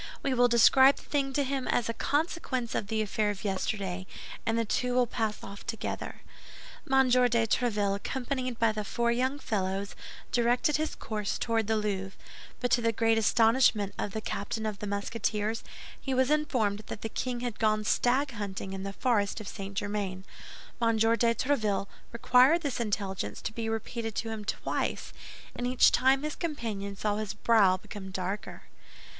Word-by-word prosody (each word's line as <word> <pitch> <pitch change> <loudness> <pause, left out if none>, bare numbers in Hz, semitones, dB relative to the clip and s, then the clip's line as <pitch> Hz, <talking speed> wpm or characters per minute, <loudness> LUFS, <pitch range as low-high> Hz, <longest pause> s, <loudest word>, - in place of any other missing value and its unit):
We 270 - +1
will 245 -1 +5
describe 260 +3 +6
the - - -13
thing 275 -2 -1
to 285 - +2
him 270 -1 -2
as 240 - +1
a 230 - -1
consequence 285 -4 -1
of 200 - -2
the 220 +1 0
affair 210 0 0
of 200 -2 -4
yesterday, 190 -2 -2 0.4
and 225 0 +2
the 230 - +1
two 250 +4 0
will 250 -1 +4
pass 220 -2 -3
off 200 0 -9
together." 225 -2 -4 0.7
M. 265 -1 +5
de 250 0 +5 0.2
Tréville, 210 -4 +1
accompanied 255 +2 -3
by 230 -1 +3
the 215 0 -3
four 235 +3 0
young 260 +4 0
fellows, 200 -6 -2 0.4
directed 245 +6 +2
his 310 +1 -2
course 210 -2 -3
toward 225 -2 0
the 220 0 +2
Louvre; 195 -2 -3 0.4
but 245 -1 -1
to 240 0 +4
the 230 0 +2
great 225 0 +2
astonishment 225 -2 +3
of 200 - -3
the 220 - -3
captain 220 +2 -3
of 210 -2 -3
the 210 - -4
Musketeers, 210 +2 -2 0.4
he 265 -1 -2
was 260 +2 +2
informed 245 -9 +1
that - - -6
the - - -2
king 240 +2 -3
had 245 -3 -4
gone 215 -1 +2
stag 260 +6 +2
hunting 200 -3 -5
in 190 - -5
the 195 0 -5
forest 215 -3 +1
of 215 - -8
St. 195 0 -7
Germain. 205 -3 -2 0.6
M. 230 -1 +3
de 225 +1 +3 0.3
Tréville 215 -7 0 0.3
required 255 +7 +5
this 285 -4 -2
intelligence 200 -4 -2
to 220 - -3
be 225 0 -3
repeated 225 0 -3
to 225 - -2
him 220 -2 -5
twice, - - -2 0.4
and 245 - -2
each 255 0 +5
time 265 +3 +3
his 305 0 -2
companions 210 - -4
saw 210 -1 +1
his 215 -2 -4
brow 205 -4 +4
become 190 +1 -9
darker. 190 +2 -4
225 Hz, 175 wpm, -29 LUFS, 205-250 Hz, 0.7 s, describe